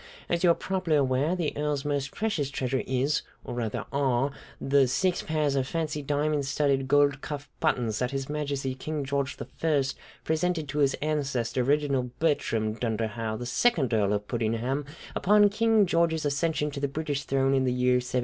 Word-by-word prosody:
As 170 +1 -1
you 175 - +6
are 170 - +5
probably 185 -4 -1
aware, 140 +4 +2
the 170 -5 -2
Earl's 150 -1 -1
most 140 -2 -1
precious 170 -11 -1
treasure 130 -1 -1
is, 130 +3 +1 0.2
or, - - -6
rather, 115 -3 -3
are 135 -1 +1 0.3
the 135 -1 +3
six 180 +8 +1
pairs 155 -3 0
of 130 -1 0
fancy, 155 -2 -2
diamond 145 0 0
studded, 135 -1 +1
gold 145 0 +3
cuff 145 -1 -6
buttons 115 -4 0
that 125 - 0
His 135 0 -3
Majesty 140 -3 -2
King 145 +2 -4
George 140 0 -1
I 155 -4 0 0.4
presented 160 -1 0
to 145 +2 -2
his 140 -2 +3
ancestor, 135 -5 0
Reginald 135 -3 0
Bertram 115 -9 +1
Dunderhaugh, 110 -1 -2
the 120 - -5
second 135 - +2
Earl 105 -2 +2
of 105 0 -2
Puddingham, 120 +4 -1 0.3
upon 205 +1 +5
King 220 0 +3
George's 165 -3 +1
accession 150 +1 0
to 140 - -5
the 140 - 0
British 145 -1 -3
throne 135 0 +2
in 135 -1 +2
the 125 - +2
year 125 0 +3
1714. 125 0 -1
140 Hz, 180 wpm, -27 LUFS, 130-155 Hz, 0.4 s, you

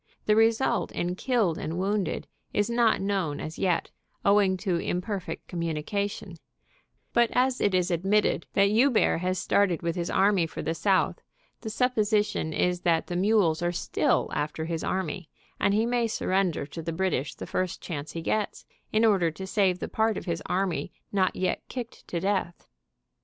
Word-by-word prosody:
The 210 - +4
result 225 +3 +2
in 175 +1 -1
killed 210 - 0
and 165 +2 -4
wounded 195 +1 -1 0.3
is 205 +3 +1
not 235 -2 +3
known 190 -7 -1
as 155 - -6
yet, 180 -3 0 0.3
owing 200 -2 +4
to 180 -2 -1
imperfect 180 +2 -3
communication, 170 +2 -3 0.8
but 235 -1 +4
as 255 0 +2
it 200 -2 +2
is 180 0 +1
admitted 190 +1 +1
that 200 +1 +4
Joubert 235 -5 +3
has 185 +1 -1
started 185 -4 +1
with 170 0 -1
his 175 -1 -2
army 195 -4 +3
for - - -6
the 165 - -1
south, 190 +3 +1 0.4
the 220 - -6
supposition 215 -7 +1
is 180 +2 0
that 165 -2 +2
the 175 - -5
mules 185 -4 +3
are 175 0 +1
still 175 - 0
after 150 +2 -2
his 165 -1 -3
army, 185 -2 -3 0.3
and 200 - +3
he 215 +3 +2
may 240 -1 +1
surrender 190 -7 0
to 160 +3 -7
the 165 +1 -3
British 165 -5 -1
the - - -7
first 185 -1 -2
chance 150 -3 -6
he 165 - -4
gets, 210 +4 -1 0.3
in 220 +1 +3
order 190 -6 +4
to 175 +4 -7
save 190 -2 +2
the - - -4
part 220 0 +1
of - - -6
his 170 -3 -2
army 180 -5 -1 0.2
not 190 -2 +1
yet 185 - -1
kicked 245 -2 -7
to 170 - -2
death. 190 -2 -1
190 Hz, 175 wpm, -27 LUFS, 170-210 Hz, 0.8 s, The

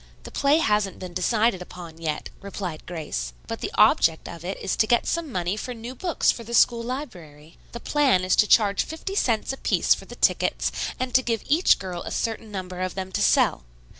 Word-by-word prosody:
"The - - -9
play 285 +2 +3
hasn't 210 - +1
been 180 -1 -8
decided 210 +2 +1
upon 170 -2 -10
yet," 155 -2 -3
replied 190 -5 -6
Grace, 105 - -4
"but - - -6
the - - -2
object 160 -1 +4
of 170 -1 -9
it 190 +2 -4
is - - -2
to 220 - +3
get 240 +1 +3
some 335 -4 -2
money 180 -1 -1
for 245 +3 -5
new 235 +2 -7
books 345 +5 +1
for 230 - -7
the 235 +1 -4
school 235 +1 +4
library. 175 - -8
The 235 - -8
plan 275 -11 +2
is 185 - +2
to 215 - +5
charge 205 -3 +4
fifty 320 +5 -6
cents 240 - 0
a - - -7
piece - - +3
for - - -8
the - - -11
tickets - - +1 0.3
and 255 -1 -3
to 260 - +6
give 230 -3 -2
each 315 +6 +4
girl 180 -2 -6
a - - -6
certain 225 -1 -3
number 185 -2 -6
of 185 -1 -3
them 190 -1 -5
to - - -1
sell. - - +3
205 Hz, 215 wpm, -25 LUFS, 180-245 Hz, 0.3 s, to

